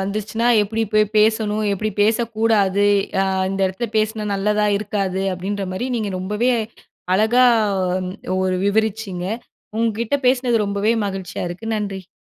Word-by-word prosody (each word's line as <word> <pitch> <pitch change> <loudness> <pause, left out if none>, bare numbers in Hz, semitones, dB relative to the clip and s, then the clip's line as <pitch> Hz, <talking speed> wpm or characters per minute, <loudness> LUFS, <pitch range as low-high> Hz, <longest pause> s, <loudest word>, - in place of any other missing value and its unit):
வந்துச்சுன்னா 215 +4 -2 0.2
எப்டி 220 +2 -2
போயி 215 0 +5
பேசணும்? 215 0 +2
எப்டி 215 +2 -2
பேசக்கூடாது? 215 -3 +2 0.3
அ - - +3 0.3
இந்த 195 0 -3
இடத்துல 190 +6 -3
பேசுனா 215 0 0
நல்லதா 210 +2 +1
இருக்காது. 195 -2 -2
அப்டின்ற 195 +2 -4
மாரி 240 +7 -3
நீங்க 215 -3 -2
ரொம்பவே 210 +7 0 0.6
அழகா 220 +5 +4 0.5
ஒ 185 0 -4
ஒரு 185 0 0
விவரிச்சீங்க. 200 -3 -1 0.5
உங்க 230 0 +2
கிட்ட 235 +5 +1
பேசுனது 245 -4 +2
ரொம்பவே 200 +3 +1
மகிழ்ச்சியா 190 -3 -5
இருக்கு. 180 +6 -8
நன்றி. 195 -3 -5
210 Hz, 135 wpm, -20 LUFS, 195-220 Hz, 0.6 s, போயி